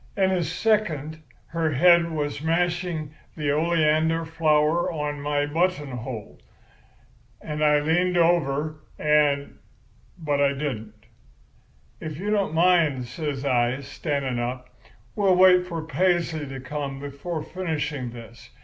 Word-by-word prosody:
In 190 -1 +3
a 185 -2 +1
second 160 -4 -1 0.3
her 165 -2 -1
head 170 +4 +5
was 145 -3 -3
mashing 170 -1 -1 0.2
the 150 -2 0
oleander 160 +1 +2
flower 160 0 +2 0.2
in 145 -1 -8
my 145 0 0
button 155 -1 0
hole, 120 -3 -7 1.0
and 150 0 -4
I 150 -1 +5
leaned 175 +4 +1
over 155 -3 +1 0.2
and—but 145 +1 -1
I 140 0 +3
didn't. 110 -7 -5 0.9
"'If 155 -3 -6
you 205 +5 -3
don't 200 -6 0
mind,' 165 -7 +3
says 140 +1 -4
I, 125 0 +1
standing 140 -2 -3
up, 125 +1 -4 0.5
'we'll 195 -3 +3
wait 180 0 +6
for 165 -3 -4
Paisley 165 -1 0
to 135 0 -7
come 135 +1 -5
before 145 +3 -5
finishing 155 -7 -3
this. 115 -1 -12
155 Hz, 120 wpm, -25 LUFS, 140-170 Hz, 1.0 s, wait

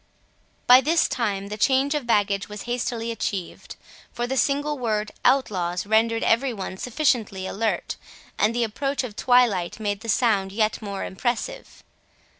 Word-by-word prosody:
By 250 +1 +8
this 320 +5 +2
time 200 -5 -2
the 210 +1 -6
change 270 +4 +3
of 290 -5 -3
baggage 200 -3 +1
was 210 -1 -7
hastily 240 -1 -2
achieved; 195 -5 -5 0.4
for 240 - -3
the 260 +2 -2
single 290 +2 0
word 215 -3 -1
"outlaws" 180 -9 +1
rendered 225 +2 +2
every 250 +4 +2
one 190 -3 -6
sufficiently 230 -6 0
alert, 220 +3 -2 0.4
and 215 +3 +1
the 240 - +1
approach 275 +6 -2
of 225 -5 -7
twilight 230 -8 +2
made 205 -2 -2
the 230 +1 -8
sound 205 -4 +2
yet 215 +2 0
more 200 -2 -4
impressive. 245 - -4
225 Hz, 150 wpm, -24 LUFS, 205-250 Hz, 0.4 s, By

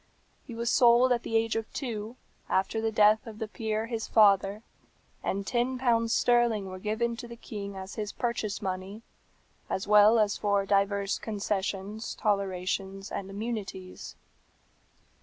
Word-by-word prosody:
"He 235 - -7
was 235 +1 -1
sold 245 +1 +5
at 240 -1 +2
the 225 - -4
age 225 0 0
of 225 -1 -3
two, 225 -3 -4 0.3
after 195 +4 0
the 225 0 0
death 215 +1 +4
of 220 -2 -8
the 220 -1 -4
peer, 220 0 -2
his 230 -1 -4
father, 205 0 +4 0.6
and 200 +1 -2
ten 245 +4 0
pounds 230 -3 +2
sterling 240 -5 +3
were 185 - -7
given 225 +4 -1
to 240 - -7
the 235 - -9
king 200 -3 -7
as 190 +1 -7
his 210 -2 -4
purchase 225 -4 -3
money, 190 +3 -5 0.7
as 190 - -2
well 210 +2 +7
as 210 -2 +2
for 200 -1 +1
divers 200 0 +1
concessions, 205 0 -3
tolerations, 195 -1 -2
and 195 - -4
immunities. 200 -3 -6
215 Hz, 150 wpm, -28 LUFS, 195-230 Hz, 0.7 s, well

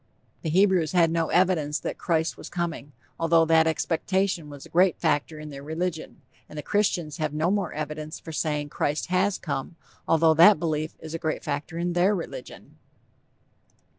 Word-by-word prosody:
The 160 - -3
Hebrews 185 -2 +3
had 170 -2 +4
no 165 -1 0
evidence 170 -5 +2
that - - -5
'Christ' 160 -2 0
was - - -10
coming, 170 -4 -4 0.3
although 165 0 +4
that 160 0 +4
expectation 170 +1 -1
was 145 -1 -10
a - - -14
great 180 +1 +3
factor 150 -2 0
in 150 0 -8
their 140 -1 -8
religion; 160 +2 -4 0.3
and 150 - -10
the 150 - -4
Christians 180 -7 0
have 155 -2 -2
no 160 +4 +1
more 200 -4 -1
evidence 155 +1 -5
for 160 - -9
saying 150 -2 -2
'Christ' 145 +3 -2
has 190 +2 +2
come, 140 +1 -4 0.3
although 160 0 +4
that 170 +5 +7
belief 155 -1 -2
is 160 0 -8
a 165 - -3
great 155 -2 -2
factor 145 +3 -4
in 175 +1 -1
their 185 +4 +3
religion. 200 - -8
160 Hz, 175 wpm, -26 LUFS, 155-175 Hz, 0.3 s, that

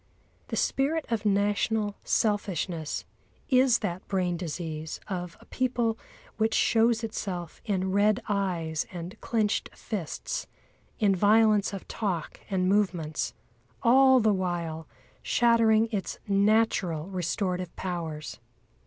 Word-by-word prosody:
The - - -3
spirit 300 +4 +1
of 220 -2 0
national 205 +1 +1
selfishness 185 -6 -1 0.4
is 255 -2 +5
that 180 -1 -4
brain 180 -3 0
disease 160 -2 -5
of 180 -3 -5
a - - -17
people 245 -3 0 0.4
which 220 0 +1
shows 230 0 +3
itself 180 -6 -5
in 190 -3 0
red 205 +2 +3
eyes 175 -6 -1
and 175 +3 -7
clenched 220 -3 0
fists, 195 -9 -4 0.5
in 200 -4 +3
violence 210 +1 +4
of 195 -2 -7
talk 185 -8 -3
and 185 -2 +1
movements, 180 -6 0 0.5
all 260 +2 +6
the 215 -2 +3
while 170 -4 -3 0.3
shattering 230 -2 +4
its 200 -3 -3
natural 200 -5 +2
restorative 180 -1 -2
powers. 165 -7 -5
200 Hz, 110 wpm, -28 LUFS, 175-220 Hz, 0.5 s, all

